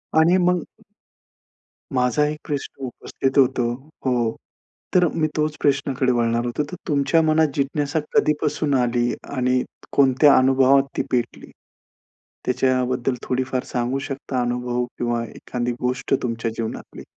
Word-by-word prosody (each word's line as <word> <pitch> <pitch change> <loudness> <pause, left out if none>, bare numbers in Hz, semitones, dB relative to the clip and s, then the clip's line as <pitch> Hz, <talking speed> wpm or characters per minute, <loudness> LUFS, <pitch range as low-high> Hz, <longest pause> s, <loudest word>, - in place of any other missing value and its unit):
आणि 165 +4 +5
मग 180 -1 +2 1.3
माझा 125 +2 +2
1 150 0 -4
प्रश्न 140 -2 -4
उपस्थित 135 +2 -3
होतो, 130 -2 +4 0.4
हो. 120 -3 +1 0.6
तर 180 -1 +5
मी 155 0 0
तोच 150 -1 0
प्रश्नाकडे 135 -2 +1
वळणार 115 0 +1
होतो, 120 +5 -1
तर - - -4
तुमच्या 145 +2 +3
मनात 155 0 +3
जिज्ञासा 145 +2 0 0.2
कधीपासून 150 -1 +1
आली, 120 -1 +2 0.3
आणि 125 0 +2 0.3
कोणत्या 140 +1 +6
अनुभवात 135 +1 +5
ती - - +1
पेटली? 120 -1 -2 1.0
त्याच्याबद्दल 125 0 +1
थोडीफार 130 0 -1
सांगू 125 +2 0
शकता 135 -1 -3
अनुभव, 125 0 -1
किंवा 120 -1 -1
एखादी 120 +2 -4
गोष्ट 125 +2 -1
तुमच्या 115 -1 -2
जीवनातली? 115 -1 -6
130 Hz, 120 wpm, -22 LUFS, 125-145 Hz, 1.3 s, कोणत्या